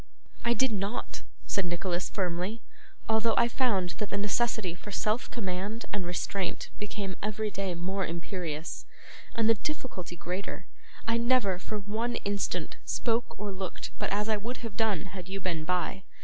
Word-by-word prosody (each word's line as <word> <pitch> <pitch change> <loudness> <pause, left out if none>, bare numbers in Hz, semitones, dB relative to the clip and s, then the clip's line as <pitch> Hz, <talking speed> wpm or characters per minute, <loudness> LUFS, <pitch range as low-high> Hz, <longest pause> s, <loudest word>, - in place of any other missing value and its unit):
'I 235 0 +4
did 260 0 +4
not,' 200 +2 -1 0.2
said 195 - +2
Nicholas, 175 +1 0
firmly. 185 +4 0 0.4
'Although 220 0 +4
I 235 - +7
found 210 -8 +2
that 210 - 0
the 200 - 0
necessity 210 -2 +2
for 185 +4 -9
self 215 +4 +1
command 200 +1 -2
and 195 -4 0
restraint 180 +1 -1
became 200 -2 -2
every 215 0 0
day 190 -2 -1
more 190 +3 0
imperious, 170 -2 -3 0.5
and 225 -1 +4
the 225 - +8
difficulty 225 - -3
greater, 180 +3 -3 0.4
I 230 0 +4
never, 235 -6 +4
for 215 +3 -3
one 220 +4 0
instant, 200 0 0
spoke 230 -2 +1
or 205 0 -1
looked 190 -1 -4
but - - +1
as 210 +2 +2
I 215 -1 +4
would 235 +5 -3
have 220 -3 -5
done 210 -7 +2
had 185 -2 -6
you 195 +1 -2
been 170 -4 -1
by. 180 +2 +1
200 Hz, 165 wpm, -31 LUFS, 185-225 Hz, 0.5 s, the